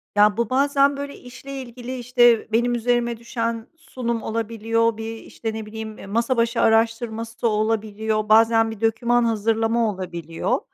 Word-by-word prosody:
Ya, 205 0 +4
bu 235 -2 0
bazen, 280 +1 +3
böyle, 280 0 -6
işle 270 +2 -9
ilgili, 250 +1 -7
işte, 240 -2 +3
benim 240 +2 +2
üzerime 240 0 0
düşen 230 0 -3
sunum 235 -7 -4
olabiliyor. 230 0 0
Bir, 225 0 -5
işte, 225 0 -6
ne 220 0 -5
bileyim, 220 0 -8
e, - - -9
masa 230 +5 0
başı 230 +1 +1
araştırması 225 0 0
da 235 - +3
olabiliyor, 215 0 -1
bazen 225 +1 +5
bir 220 - -10
doküman 235 +2 +2
hazırlama 225 +1 +1
olabiliyor. 170 -3 -3
230 Hz, 150 wpm, -22 LUFS, 220-240 Hz, -, bazen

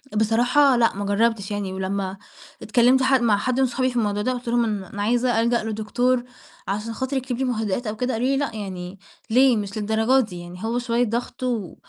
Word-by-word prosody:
بصراحة 245 +6 +3
لأ 230 -1 +3
ما 200 +1 -3
جرّبتش 205 0 +1
يعني، 205 -2 -3
ولمّا 190 0 -3 0.4
اتكلمت 245 +4 +3
حد 265 -1 +3
مع 220 -4 +3
حد 255 +5 -1
من 265 - +4
صحابي 255 +1 0
في 250 - -8
الموضوع 205 -3 0
ده 255 - 0
وقُلت 245 0 -7
لهم 240 0 +2
أن 210 -3 -2
أنا 200 +2 -7
عايزة 240 +1 +2
ألجأ 235 -1 +1
لدكتور 235 +3 0 0.4
عشان 210 +4 -3
خاطر 260 +3 -2
يكتب 255 -2 -3
لي 265 - -1
مهدئات 225 -2 -1
أو 210 - -3
كده، 250 +3 -1
قالوا 235 +3 0
لي: 270 0 +2
"لأ 280 -5 -2
يعني 190 -2 -6 0.3
ليه؟! 255 +1 +5
مش 205 0 -4
للدرجة 220 +5 +2
دي 180 -4 -9
يعني 175 +2 -10
هو 230 +2 -1
شوية 240 0 0
ضغط 240 +3 -4
و 230 -8 -2
230 Hz, 210 wpm, -23 LUFS, 205-250 Hz, 0.4 s, ليه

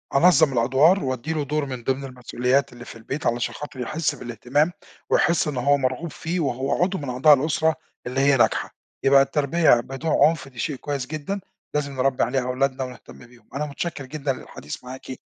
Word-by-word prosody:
أنظَّم 155 -2 +5
الأدوار، 135 +10 +4
وأدّي 130 +4 -2
له 150 -2 -1
دُور 150 +1 -1
من 130 -3 -6
ضمن 135 +2 -1
المسئوليات 125 +1 -1
اللي 120 0 -11
في - - -10
البيت 130 +7 -6
علشان 120 +1 0
خاطر 140 -3 -8
يحس 155 +6 -1
بالاهتمام، 125 +7 0 0.4
ويحس 170 -2 +3
إن 140 -4 -3
هو 140 +2 +3
مرغوب 130 +5 -2
فيه، 170 +2 -3
وهو 135 +3 0
عضو 190 +1 0
من 140 -3 -5
أعضاء 135 +5 +6
الأسرة 155 +3 +2 0.3
اللي 130 +2 -2
هي 140 -1 +4
ناجحة، 120 - +1 0.3
يبقى 135 0 +6
التربية 140 -1 +3
بدون 135 +6 -4
عنف 150 -3 +2
دي 125 -3 -13
شيء 150 - -1
كويس 140 -2 -4
جدًا، 155 +7 -4 0.3
لازم 140 -2 -1
نربي 130 0 +1
عليها 130 +1 0
أولادنا 130 +1 -1
ونهتم 125 -1 -10
بيهم. 120 -3 -21
أنا 150 +2 -1
متشكر 145 -1 -5
جدًا 140 0 -2
للحديث 75 - -9
معاكِ، 130 +1 -9
135 Hz, 185 wpm, -23 LUFS, 125-150 Hz, 0.4 s, أعضاء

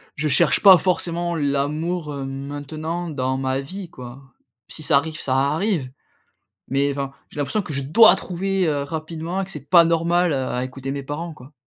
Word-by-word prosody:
je 150 +1 -1
cherche 140 - +3
pas 190 -3 +9
forcément 175 -1 -1
l'amour 150 +3 -1
maintenant 145 +5 -5
dans 130 -2 -1
ma 130 0 -1
vie 185 +5 -8
quoi. 125 -2 -10 0.5
Si 155 - -9
ça 140 -1 +4
arrive, 155 +2 -2
ça 130 -1 -1
arrive. 150 +1 0 0.8
Mais 140 +1 +1
enfin, 140 -1 -4 0.2
j'ai - - -15
l'impression 205 +9 0
que 155 - -7
je 140 - -2
dois 190 +7 +7
trouver, 190 0 -1
heu, 145 -2 0
rapidement, 160 +5 -4
que 195 - -9
c'est 145 -2 -10
pas 170 -2 +8
normal 170 0 +2
à 130 -1 -2
écouter 135 +1 -6
mes 140 -1 -4
parents 155 +4 -5
quoi. 130 0 -15
150 Hz, 175 wpm, -22 LUFS, 140-170 Hz, 0.8 s, pas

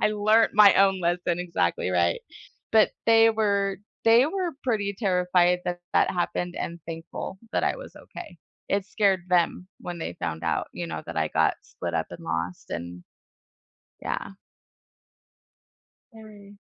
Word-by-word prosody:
I - - +3
learned 215 +2 +3
my 210 -1 +8
own 195 -1 +4
lesson, 175 0 0
exactly, 170 - -1
right. 85 -1 +1 0.5
But 220 -1 +5 0.2
they 225 0 +6
were 200 -3 0 0.3
they 230 +2 +6
were 360 +1 -2
pretty 205 -5 -1
terrified 180 -3 +2
that 175 0 -3
that - - +3
happened 175 0 -2
and 170 0 -5
thankful 165 +3 -7
that - - 0
I - - 0
was - - -11
okay. - - -11 0.3
It 200 -1 0
scared 195 -4 +1
them 180 0 +1
when 175 -1 -6
they 85 - -5
found 80 -2 -4
out, 80 -2 -1
you 85 -1 -5
know, 80 -1 -5
that 85 - -7
I 80 -1 +1
got 80 0 +2
split 85 - -6
up 80 -1 0
and 85 - -9
lost, 85 +2 -4
and, 85 +1 -6 1.0
yeah. - - -3 1.9
Very. 205 -2 -14
180 Hz, 150 wpm, -26 LUFS, -, 1.9 s, my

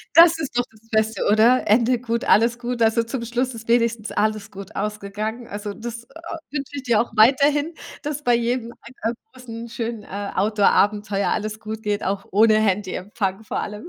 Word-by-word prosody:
Das 335 0 +8
ist 275 -6 -3
doch 245 - +2
das 225 +1 -23
Beste, 220 0 +1
oder? 230 +4 +4
Ende 235 +3 +4
gut, 235 -1 -2
alles 230 +2 +4
gut. 240 -1 -2
Also, 225 +1 +3
zum 235 +1 -4
Schluss 245 +2 -1
ist 230 0 -10
wenigstens 230 -2 +1
alles 215 0 -1
gut 195 -1 -10
ausgegangen. 210 +3 -4
Also, 205 0 -6
das, 235 +1 -7
äh, - - -37 0.4
wünsche 285 0 -5
ich 275 - -4
dir 230 -3 +3
auch 240 - -2
weiterhin, 285 +7 +4 0.3
dass 295 0 -4
bei 245 -1 +4
jedem 235 0 -1
ein 235 -2 -4
äh, - - -10 0.2
großen, 235 -2 -8
schönen, 230 -2 -4
äh, 200 0 -5
Outdoor 205 +1 +3
Abenteuer 205 -1 +1
alles 215 0 -2
gut 220 0 -6
geht, 210 -1 -1
auch 195 +1 -2
ohne 215 +2 +5
Handyempfang 200 0 -1
vor - - -3
allem, 210 +9 -6
225 Hz, 190 wpm, -22 LUFS, 210-240 Hz, 0.4 s, Das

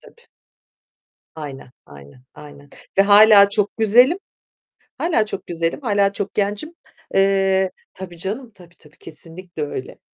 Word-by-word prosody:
Tabii. 470 0 -20 1.1
Aynen, 140 -5 -9
aynen, 70 - -16
aynen 145 -1 -14 0.3
ve - - +7
hâlâ 205 0 +7
çok 205 0 -1
güzelim. 245 - +5 0.8
Hâlâ 320 -11 0
çok 195 -2 -7
güzelim. 165 - -2
Hâlâ 200 -5 +1
çok 200 0 -5
gencim. 205 +10 -2 0.4
Eee, 195 -1 +2 0.2
tabii 180 -2 -10
canım. 220 +8 -5
Tabii 175 -2 -18
tabii 155 -1 -20
kesinlikle 165 +1 -7
öyle. 145 -3 -7
195 Hz, 125 wpm, -20 LUFS, 165-210 Hz, 1.1 s, ve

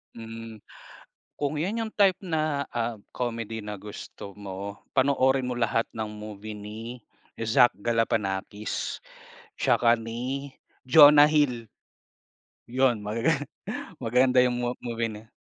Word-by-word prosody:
Hmm, 115 -1 -9 0.8
kung 145 +1 -1
yun 205 +9 -1
yung - - -10
type 195 -3 +4
na 155 -5 -1
ah 115 -1 -2
comedy 115 -2 -3
na 105 0 -4
gusto 100 -1 -9
mo 100 0 -6 0.2
panoorin 130 -1 +3
mo 125 - -3
lahat 115 -1 +2
ng 110 -1 -2
movie 105 0 -8
ni 105 +2 -8 0.6
Zach 115 +2 +5
Galifianakis. 105 -3 -1 0.5
Tsaka 120 -1 +4
ni 125 +5 -4 0.4
Jonah 145 +1 +9
Hill. 125 -7 +1 1.0
Yun 125 -2 +2
magaga 115 +9 0 0.7
maganda 125 +2 +2
yung 125 -1 0
m 120 0 -2
movie 115 -1 -1
na 110 +1 -10
115 Hz, 115 wpm, -27 LUFS, 110-135 Hz, 1.0 s, Jonah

